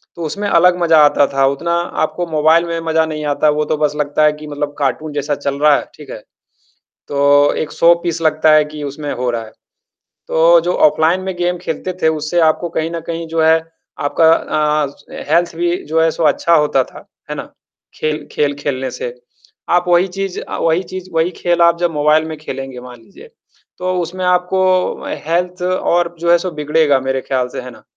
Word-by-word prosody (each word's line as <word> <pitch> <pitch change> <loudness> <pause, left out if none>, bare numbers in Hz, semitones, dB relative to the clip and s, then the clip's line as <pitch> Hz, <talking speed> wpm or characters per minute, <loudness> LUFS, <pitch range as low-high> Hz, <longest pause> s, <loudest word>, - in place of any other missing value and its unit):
तो 170 - -6
उसमें 200 +6 -3
अलग 180 0 +4
मज़ा 165 -2 +4
आता 145 -1 +3
था। 135 0 +3
उतना 165 +5 -1 0.3
आपको 155 +3 -2
मोबाइल 160 +2 +3
में 170 0 -3
मज़ा 160 0 +2
नहीं 155 -1 -5
आता। 145 +1 +1
वो 150 0 0
तो 155 - -1
बस 150 -1 0
लगता 150 +1 0
है 150 - +5
कि 150 0 -11
मतलब 145 0 -4
कार्टून 145 +3 -2
जैसा 145 0 -2
चल 140 0 -4
रहा 150 -1 +5
है। - - -1
ठीक 145 -3 -13
है। - - -6 0.9
तो 145 0 +3
एक 155 - -6
शो-पीस 170 0 +2
लगता 155 0 +3
है 155 -1 +5
कि 150 0 -9
उसमें 145 +1 -5
हो 125 0 -2
रहा 115 -1 -3
है। 110 - -13 0.8
तो 165 +1 +5
जो 175 +2 -1
ऑफलाइन 160 +5 +1
में 190 -1 -4
गेम 175 0 -1
खेलते 175 +3 -4
थे, 160 - +3
उससे 155 +2 0
आपको 160 +2 +1
कहीं 160 0 -3
न 170 - -4
कहीं 165 0 -4
जो 165 0 -1
है 160 +1 +4 0.4
आपका 160 +3 +3
अ, 150 -2 0 0.4
हेल्थ 170 +1 +2
भी 175 +1 0
जो 160 +1 +1
है 165 - +3
सो 165 - -3
अच्छा 155 +3 +2
होता 150 -4 +2
था। - - -14 0.2
है - - -4
ना? - - -8 0.4
खेल 155 -1 -3
खेल 145 -1 0
खेलने 130 -2 -3
से। 120 - -5 0.6
आप 175 0 +2
वही 175 +2 +3
चीज़ 195 0 -4
अ, - - -6
वही 165 +3 +1
चीज़, 185 +1 -8
वही 165 +2 +1
खेल 175 -1 +1
आप 170 0 +4
जब 175 -1 0
मोबाइल 150 +1 +2
में 160 -1 -6
खेलेंगे 135 -4 -7
मान 125 -1 -12
लीजिए। 455 - -16 0.5
तो 185 0 -1
उसमें 185 +2 -5
आपको 185 +1 +1 0.2
हेल्थ 180 +2 -1
और 175 -1 0
जो 170 +1 +1
है 175 - +6
सो 185 0 -4
बिगड़ेगा 150 -2 +1
मेरे 130 0 -2
ख्याल 130 -1 -1
से, - - -6
है 125 0 -9
ना? - - -17
160 Hz, 205 wpm, -16 LUFS, 145-170 Hz, 0.9 s, है